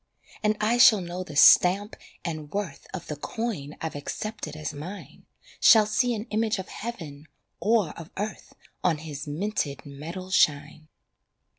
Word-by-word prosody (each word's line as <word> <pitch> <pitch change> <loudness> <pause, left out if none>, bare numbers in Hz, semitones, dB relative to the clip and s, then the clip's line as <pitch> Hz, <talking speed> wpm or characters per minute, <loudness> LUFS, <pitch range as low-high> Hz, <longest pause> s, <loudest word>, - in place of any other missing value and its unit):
And 215 0 +1
I 225 +3 +1
shall 220 -3 +8
know 180 0 -5
the 155 -5 -10
stamp 190 +7 +6 0.3
and 155 -3 -4
worth 195 -8 -4
Of 175 -3 -6
the 150 - -5
coin 155 -3 -4
I've 160 -2 -4
accepted 185 +2 -5
as 155 -2 -5
mine, 170 +8 -9 0.3
Shall 220 -2 +7
see 240 +3 +1
an 215 0 -5
image 220 0 +1
of 190 - -7
heaven 160 -10 -7 0.3
or 215 -6 +2
of 165 0 -10
earth 205 -1 -5 0.3
On 160 - +2
his 150 -1 -7
minted 150 -3 -3
metal 165 +7 -8
shine. 155 -2 +1
180 Hz, 150 wpm, -26 LUFS, 150-215 Hz, 0.3 s, shall